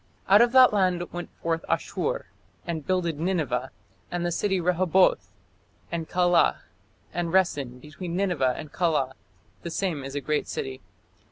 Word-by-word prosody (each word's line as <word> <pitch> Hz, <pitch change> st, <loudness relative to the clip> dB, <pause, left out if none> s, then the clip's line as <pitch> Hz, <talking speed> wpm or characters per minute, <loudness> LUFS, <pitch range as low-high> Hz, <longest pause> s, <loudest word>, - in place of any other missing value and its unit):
Out 200 Hz, +3 st, +7 dB
of 235 Hz, 0 st, +4 dB
that 255 Hz, -3 st, +7 dB
land 180 Hz, -3 st, +1 dB
went 175 Hz, 0 st, -5 dB
forth 165 Hz, 0 st, 0 dB
Asshur -, -, -1 dB, 0.4 s
and 160 Hz, -4 st, -4 dB
builded 170 Hz, -5 st, 0 dB
Nineveh, 155 Hz, -8 st, -1 dB, 0.4 s
and 175 Hz, 0 st, -2 dB
the 175 Hz, -, 0 dB
city 190 Hz, +2 st, 0 dB
Rehoboth, 180 Hz, -, +2 dB, 0.6 s
and 165 Hz, -1 st, -3 dB
Calah, 175 Hz, -1 st, +3 dB, 0.5 s
and 175 Hz, 0 st, -1 dB
Resen 145 Hz, -9 st, +1 dB
between 170 Hz, +5 st, -7 dB
Nineveh 175 Hz, -10 st, +1 dB
and 155 Hz, -2 st, -8 dB
Calah: 155 Hz, -7 st, +1 dB, 0.5 s
the 170 Hz, -, -5 dB
same 165 Hz, -5 st, -2 dB
is 135 Hz, +1 st, -7 dB
a -, -, 0 dB
great 150 Hz, +1 st, -1 dB
city. 130 Hz, -1 st, -5 dB
170 Hz, 150 wpm, -26 LUFS, 150-185 Hz, 0.6 s, Out